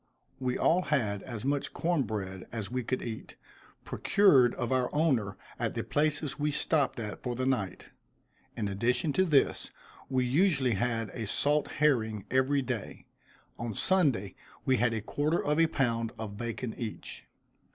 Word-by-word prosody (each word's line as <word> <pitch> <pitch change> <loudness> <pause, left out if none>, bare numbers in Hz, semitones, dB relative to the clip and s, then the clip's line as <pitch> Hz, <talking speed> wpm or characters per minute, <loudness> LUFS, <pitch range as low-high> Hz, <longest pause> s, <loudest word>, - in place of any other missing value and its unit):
We 130 -1 -1
all 175 +3 +3
had 115 - 0
as 120 -2 -6
much 140 0 -1
corn 170 -2 +1
bread 95 -6 -4
as 110 -3 -5
we 125 0 -1
could 130 +3 -2
eat, 115 -2 -6 0.5
procured 140 - +4
of 120 -1 -3
our 130 -1 +2
owner 125 - +1 0.2
at - - -1
the - - -1
places 150 -1 0
we 150 +1 +1
stopped 145 -2 +1
at 105 -3 -5
for 125 -1 -3
the 130 +1 -1
night. 115 -8 -1 0.7
In 110 -3 -1
addition 120 - 0
to 190 - +3
this 150 -6 +2 0.4
we 130 -1 +1
usually 140 -2 +3
had 115 +2 -1
a 115 -3 -5
salt 145 +7 +1
herring 110 -9 +1
every 130 +2 +2
day. 125 -5 -5 0.5
On 115 -3 -4
Sunday 135 - +2 0.3
we 130 -1 +3
had 120 0 +2
a 110 - -2
quarter 150 +9 0
of 150 +2 +2
a 165 - +5
pound 115 -6 0
of 110 -2 -6
bacon 120 +1 -4
each. 115 -3 -6
125 Hz, 160 wpm, -30 LUFS, 110-145 Hz, 0.7 s, a